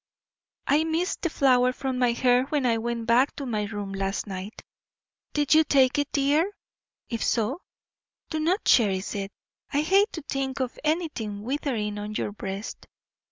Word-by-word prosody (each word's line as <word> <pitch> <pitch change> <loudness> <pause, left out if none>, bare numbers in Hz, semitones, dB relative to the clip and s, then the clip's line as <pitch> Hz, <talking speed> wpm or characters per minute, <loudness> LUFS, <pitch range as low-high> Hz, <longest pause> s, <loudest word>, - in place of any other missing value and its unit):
I 300 +2 +3
missed 325 +3 -1
the 340 - 0
flower 255 -4 +3
from 260 -1 -3
my 245 -2 +3
hair 250 +1 +3
when 285 -1 -1
I 230 -2 +2
went 235 0 -3
back 245 +4 +3
to 280 - -5
my 215 -4 -1
room 205 -1 -5
last 195 0 -2
night. 195 +1 -7 0.7
Did 295 -1 +2
you 315 +1 +7
take 275 -1 +3
it, 290 0 -1
dear? 290 +6 +2 0.6
If 230 -2 -2
so, 245 - 0 0.7
do 315 - -1
not 350 +7 0
cherish 195 -5 +3
it. 195 -1 -4 0.4
I 285 - +2
hate 390 +7 +3
to 325 - -6
think 270 -2 -3
of 255 -2 -3
anything 300 - -2
withering 230 -5 -2
on 210 +1 -5
your - - -2
breast. 200 0 -6
255 Hz, 165 wpm, -26 LUFS, 210-295 Hz, 0.7 s, you